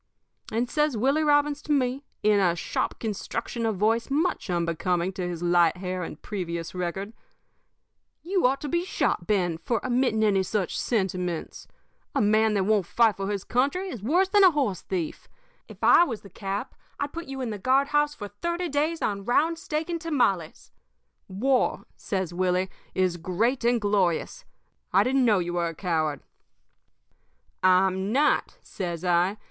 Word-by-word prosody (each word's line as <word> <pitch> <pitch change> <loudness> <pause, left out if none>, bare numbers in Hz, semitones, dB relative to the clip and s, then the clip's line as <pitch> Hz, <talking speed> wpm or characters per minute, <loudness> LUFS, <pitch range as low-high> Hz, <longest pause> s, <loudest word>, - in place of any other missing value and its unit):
"And 235 +3 0
says 300 -2 0
Willie 275 +7 +2
Robbins 290 0 +2
to - - -5
me, 265 -1 +1 0.2
in 210 -1 +4
a 175 -3 +3
sharp 170 - -2
construction 230 +2 -3
of 220 - 0
voice 225 +5 +1
much 305 - 0
unbecoming 175 +1 0
to 180 -1 -3
his 175 -1 -5
light 175 0 +3
hair 185 0 -4
and 160 -3 -6
previous 170 -5 -5
record: 185 +4 -4 1.1
"'You 365 -5 +2
ought 270 +2 -1
to 295 - -4
be 340 +5 0
shot, 180 - -1
Ben, 175 -6 +1
for 225 +7 -1
emitting 245 -3 +1
any 200 -3 +3
such 190 0 -2
sentiments. 185 -6 -2 0.5
A - - +2
man 215 +1 +3
that 195 - +2
won't 200 -3 +1
fight 230 -3 +3
for 195 +1 -4
his 200 -2 -2
country 285 +10 0
is 240 - -7
worse 345 - +2
than 405 +1 +4
a 375 - +9
horse 270 - -1
thief. 175 -5 -4 0.4
If - - -13
I - - +7
was 230 -11 -4
the 200 - -14
cap, 200 +4 -4 0.3
I'd 285 0 -3
put 335 0 -6
you 270 0 -6
in 250 -4 -3
the 210 - -5
guard 265 +6 +2
house 295 0 +2
for 205 -7 -6
thirty 340 - -3
days 310 +3 0
on 200 -1 -1
round 320 +9 +1
steak 310 0 -3
and 340 -2 -3
tamales. 240 - -1 0.6
War,' 250 +7 0
says 190 -4 -3
Willie, 185 +1 0 0.2
'is 185 -2 +1
great 215 +10 0
and 240 0 +3
glorious. 205 - 0 0.5
I - - +5
didn't 260 0 +2
know 215 -4 +4
you 175 -1 -2
were 175 -1 0
a 165 - -6
coward.' 155 -5 -1 1.4
"'I'm 190 +1 +3
not,' 285 +5 +2
says 175 -2 -5
I. 180 +3 +2
210 Hz, 170 wpm, -26 LUFS, 180-275 Hz, 1.4 s, a